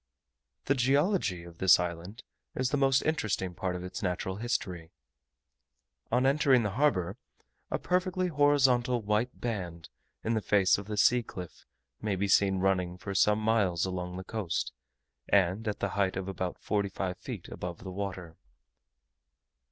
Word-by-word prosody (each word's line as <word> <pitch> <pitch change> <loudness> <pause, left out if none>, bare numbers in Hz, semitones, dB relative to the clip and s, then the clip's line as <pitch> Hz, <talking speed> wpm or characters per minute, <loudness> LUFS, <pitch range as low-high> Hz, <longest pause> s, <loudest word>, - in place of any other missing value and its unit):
The 135 - +3
geology 135 - +1
of 85 -1 -13
this 95 -1 +6
island 90 +4 -5 0.3
is 130 - 0
the - - +2
most 135 -1 +3
interesting 105 - -1
part 90 +1 -3
of 90 - -5
its 90 0 -6
natural 95 +1 -2
history. 90 -8 -3 1.2
On 125 +2 +3
entering 135 -3 +4
the 105 - -1
harbour, 100 - +1 0.5
a - - 0
perfectly 185 0 0
horizontal 130 -5 +3
white 105 +4 0
band, 90 -8 -4 0.3
in 115 - 0
the 110 - 0
face 100 -2 +3
of 100 - -9
the 105 -1 -4
sea 120 +4 +5
cliff, 90 -6 -10 0.3
may 105 -2 -1
be 100 +2 -1
seen 95 -1 +4
running 90 -2 0
for 100 +1 -6
some 105 +2 +4
miles 105 -6 +1
along 90 -1 -4
the 95 - -5
coast, 95 -4 -3 0.6
and 100 +3 +2
at 105 - -1
the 100 - 0
height 100 -1 0
of 95 0 -4
about 95 -2 -3
forty 100 -2 -1
five 95 -1 -4
feet - - -7
above 90 -1 -6
the 95 - -6
water. 95 -4 -5
100 Hz, 160 wpm, -30 LUFS, 90-120 Hz, 1.2 s, this